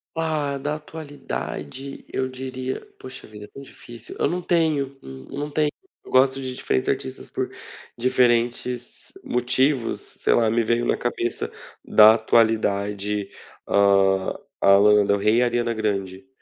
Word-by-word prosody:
Ah, 155 -3 -1
da 145 +2 -2
atualidade, 140 - -7
eu 130 - -1
diria, 130 0 -5 0.2
poxa 130 +1 -10
vida, 105 -1 -10
é - - -15
tão 140 - -12
difícil. 120 -4 -10
Eu - - +2
não 180 +1 -2
tenho, 155 -6 0
eu 65 - -10
não 145 +1 -3
tenho. 150 0 +1 0.3
Eu - - -13
gosto 130 +1 +3
de 130 -1 -5
diferentes 65 - -1
artistas 65 - -3
por - - -3 0.5
diferentes 120 0 0
motivos. 125 +1 0
Sei - - -1
lá, 115 -2 +3
me 115 +1 +2
veio 115 +2 +1
na - - +2
cabeça 120 -1 -2 0.3
da 110 +1 +7
atualidade. 105 -3 +1 0.4
Hã, 100 -1 +3 0.3
a 100 0 +7
Lana 105 0 +5
Del 100 - +2
Rey 105 +3 +2
e - - +4
a - - +3
Ariana 120 -1 0
Grande. 100 -1 -3
120 Hz, 150 wpm, -23 LUFS, 105-135 Hz, 0.5 s, da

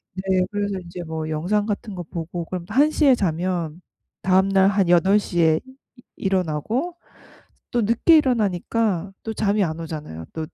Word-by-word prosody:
네. 190 -1 +1
그래서 205 -1 -2
인제 175 0 -8
뭐 160 -1 -4
영상 185 +7 0
같은 210 -1 -4
거 175 - -5
보고 170 +1 -5
그럼 180 -1 -5
1 285 +7 +4
시에 280 -5 +4
자면 175 -3 -2 0.4
다음날 190 +1 +4
한 195 -3 +1
8:00 190 0 +3
에 160 -1 +4 0.4
이 245 - -16 0.2
일어나고 195 - -1 0.8
또 240 - +1
늦게 235 +10 +4
일어나니까 210 - 0
또 225 - -4
잠이 205 -1 +1
안 160 -2 -3
오잖아요 150 - -7
또 160 - -4
190 Hz, 270 characters per minute, -23 LUFS, 170-210 Hz, 0.8 s, 1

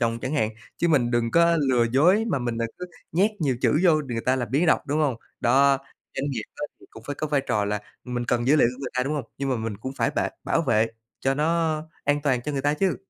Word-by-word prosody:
dòng 115 0 0
chẳng 130 +5 -3
hạn, 110 -7 +1 0.3
chứ 170 - +1
mình 130 -7 +3
đừng 120 -1 +1
có 170 +2 +4
lừa 120 -2 +4
dối 180 - +4
mà - - +1
mình 120 -2 -3
đ - - -1 0.2
cứ 180 - -5 0.3
nhét 190 +7 +3
nhiều 135 -5 +1
chữ 150 - +3
vô 155 -4 +4
đ - - -11
người 115 - -1
ta 130 +1 +3
làm 120 -4 -3
biếng 145 +7 +2
đọc, - - +3
đúng 145 +1 0
hông? 140 -6 +1 0.2
Đó, 135 +2 +4 0.4
doanh 140 +1 -1
nghiệp 120 -5 -3
á - - -7 0.2
thì - - -17
cũng - - -12
phải 145 - -3
có 155 - -3
vai 145 -2 +1
trò 105 -6 0
là 105 0 -2 0.2
mình 125 -1 -3
cần 120 +1 0
dữ 145 +4 +5
liệu 130 - +5
của - - -13
người 135 - -4
ta, 125 - +1
đúng 140 +4 -2
hông? 145 -4 -2
Nhưng 140 0 -2
mà 130 - +1
mình 110 -2 -4
cũng 130 +6 -6
phải - - +2
bệ - - 0 0.2
bảo - - +1
vệ 115 -6 +3 0.3
cho 135 0 +1
nó 160 +1 +1 0.2
an 145 +1 +2
toàn 130 -4 +1
cho 150 - -3
người 135 -1 -2
ta 145 +1 +2
chứ. 190 +3 +1
135 Hz, 280 wpm, -25 LUFS, 120-150 Hz, 0.4 s, dữ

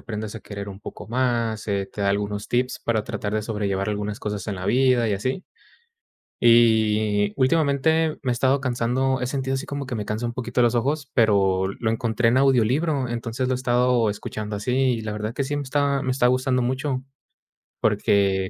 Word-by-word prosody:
aprendas 110 -1 -6
a 110 - -7
querer 100 +1 -7
un 95 - -11
poco - - -9
más, 115 -3 -1
eh, 100 -1 -1
te - - -7
da 100 - +1
algunos 100 +1 -2
tips 125 +1 0
para 110 -2 0
tratar 105 0 -4
de 110 - 0
sobrellevar 105 -2 -2
algunas 105 0 -3
cosas 105 -2 -4
en 105 - -2
la 90 -1 -6
vida 125 +1 +3
y - - 0
así. 130 - -2 1.0
Y 110 -3 +4
últimamente 155 +3 +2
me 130 - -1
he - - +2
estado 130 +3 +2
cansando 130 +1 0
He 125 - -1
sentido 135 0 -2
así 135 - -4
como 140 -1 -5
que 125 -2 -4
me 105 - -3
cansa 110 +3 -3
un 120 - -3
poquito 125 -1 -1
los 120 0 +3
ojos, 140 +3 -1
pero 95 -4 +3
lo 110 +3 -3
encontré 115 0 +1
en 125 - +3
audiolibro. 135 +2 +2
Entonces, 120 +2 -3
lo - - +2
he - - +1
estado 125 -2 +2
escuchando 105 0 -5
así. 105 +4 -3
Y 130 -3 +2
la 110 -1 -4
verdad 105 +2 -4
que 140 - -1
sí 145 +2 -2
me 145 - -3
está 140 0 0
me 130 -1 -1
está 125 -1 +2
gustando 130 0 +1
mucho, 130 +1 -2 0.8
porque 95 -2 +2
120 Hz, 200 wpm, -23 LUFS, 105-130 Hz, 1.0 s, Y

